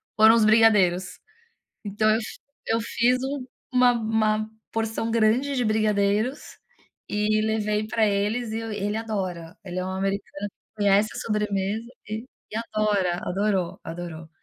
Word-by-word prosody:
foram 220 +1 +7
os 220 -2 +4
brigadeiros, 200 -5 +4 0.7
então 210 +1 0
eu 220 - +3
f 215 - -8 0.3
eu 225 +1 +1
fiz 245 +2 +2
um 270 -2 -4 0.3
uma 250 -1 +5
uma 220 -1 0 0.2
porção 225 0 -2
grande 230 +5 +2
de 245 - +1
brigadeiros 215 +3 0 0.5
e 210 +1 +1
levei 215 -1 0
pra 220 0 +2
eles 210 +3 0
e 220 - -2
ele 210 -2 -3
adora, 185 -7 -4
ele 180 -1 -5
é 185 - -1
um - - -3
americano 195 +1 -3 0.3
que 210 - -3
conhece 200 +2 +4
a - - -6
sobremesa 210 0 -1 0.2
e 220 +3 -4 0.5
adora, 200 -5 +1
adorou, 195 -2 -1
adorou. 165 -1 -7
215 Hz, 140 wpm, -25 LUFS, 200-225 Hz, 0.7 s, foram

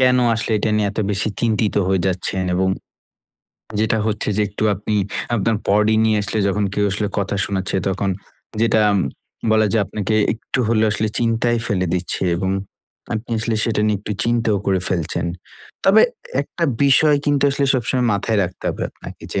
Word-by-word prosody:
কেন 125 0 +5 0.2
আসলে 110 - -3
এটা 110 - 0
নিয়ে 105 -1 +1
এত 105 - -9
বেশি 100 +2 0
চিন্তিত 110 -2 +1
হয়ে 95 -1 +1
যাচ্ছেন 95 0 -1
এবং 95 +1 +1 1.1
যেটা 110 0 +1
হচ্ছে 105 0 -1
যে, 105 - +2
একটু 105 +1 -6
আপনি 105 +2 -3 0.4
আপনার 110 0 +1
বডি 105 +2 +3
নিয়ে 110 -1 +3
আসলে 110 - -1
যখন 105 +2 0
কেউ 105 - +1
আসলে 105 +2 -1
কথা 100 0 -1
শোনাচ্ছে 95 0 -2
তখন 95 0 -1 0.5
যেটা 110 -1 +3 0.7
বলা 110 -1 +4
যায় 110 - +3
আপনাকে 105 0 -2 0.2
একটু 115 +4 -5
হলেও 110 -1 +3
আসলে 110 +1 0
চিন্তায় 120 0 +1
ফেলে 95 -4 0
দিচ্ছে 90 +1 -2
এবং 95 +1 -1 0.6
আপনি 110 +2 -5
আসলে 115 0 -1
সেটা 110 -2 0
নিয়ে 105 -1 +2
একটু 105 0 -4
চিন্তাও 115 -3 +1
করে 95 -2 +2
ফেলছেন। 85 -1 -1 0.6
তবে 200 +3 +6 0.4
একটা 170 - -3 0.2
বিষয় 145 +2 +5
কিন্তু 145 -1 +2
আসলে 140 0 0
সবসময় 125 0 +1
মাথায় 105 +2 0
রাখতে 90 +1 -6
হবে - - -3
আপনাকে - - -12
যে, - - +1
110 Hz, 170 wpm, -20 LUFS, 100-115 Hz, 1.1 s, তবে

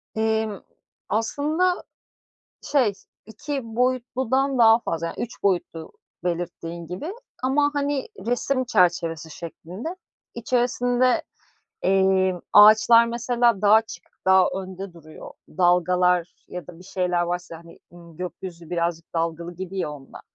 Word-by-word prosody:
Emm, 220 -2 0 0.5
aslında, 305 - 0 0.8
şey, 255 -8 +2 0.3
2 275 +7 -5 0.2
boyutludan 255 +2 0
daha 225 -1 +6
fazla 165 -6 -3
yani - - -6
3 240 - -7
boyutlu 175 -4 -1 0.3
belirttiğin 170 -1 -4
gibi, 240 - -5 0.3
ama, 290 +3 +3
hani, 285 -1 -1 0.2
resim 255 +2 0
çerçevesi 170 -6 +1
şeklinde. 180 - -7 0.4
İçerisinde, 245 +1 +1 0.6
emm, 190 -1 +3
ağaçlar 220 +3 +8
mesela 235 -2 +1
daha 205 0 +5
açık, 220 0 0 0.2
daha 190 -1 +6
önde 190 0 -6
duruyor. 155 -2 -12 0.2
Dalgalar 180 -1 +2
ya 180 -1 -7
da 175 -2 -12
bir 180 - -14
şeyler 180 -2 0
varsa, 175 -1 -4
hani, 170 0 -16
ııı, 170 -2 -15
gökyüzü 175 -1 -7
birazcık 170 -1 -2
dalgalı 170 +1 -2
gibi 190 +1 -6
ya 165 - -1
onda, 140 -2 -12
190 Hz, 120 wpm, -24 LUFS, 175-240 Hz, 0.8 s, ağaçlar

